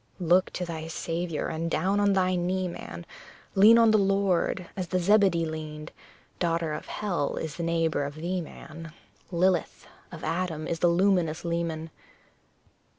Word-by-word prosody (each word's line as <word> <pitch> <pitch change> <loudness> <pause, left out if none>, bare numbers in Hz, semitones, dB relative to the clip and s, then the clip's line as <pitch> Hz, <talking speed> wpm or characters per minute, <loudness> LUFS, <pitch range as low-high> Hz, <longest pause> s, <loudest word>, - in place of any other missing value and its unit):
Look 180 +1 +3
to 180 - -3
thy 160 -2 -5
Saviour, 165 0 -3
and 165 +1 -3
down 190 +6 +1
on 205 -1 +3
thy 185 -1 +2
knee, 185 +1 0
man, 85 - -8 0.5
Lean 210 +4 +7
on 230 -1 +6
the 215 - +4
Lord, 195 -2 +1
as 185 -2 -3
the 185 - 0
Zebedee 185 -2 +3
leaned; 155 0 -6 0.5
Daughter 165 -2 0
of 150 - -6
hell 180 -9 -2
is 160 0 -5
the - - -4
neighbour 165 -3 0
of 145 +1 -6
thee, 175 +3 -2
man 165 0 -10 0.4
Lilith, 180 0 +1 0.3
of 165 -2 -9
Adam 165 -1 -2
the 170 +2 +1
luminous 175 -2 +2
leman! 165 -1 -2
170 Hz, 150 wpm, -27 LUFS, 160-185 Hz, 0.5 s, Lean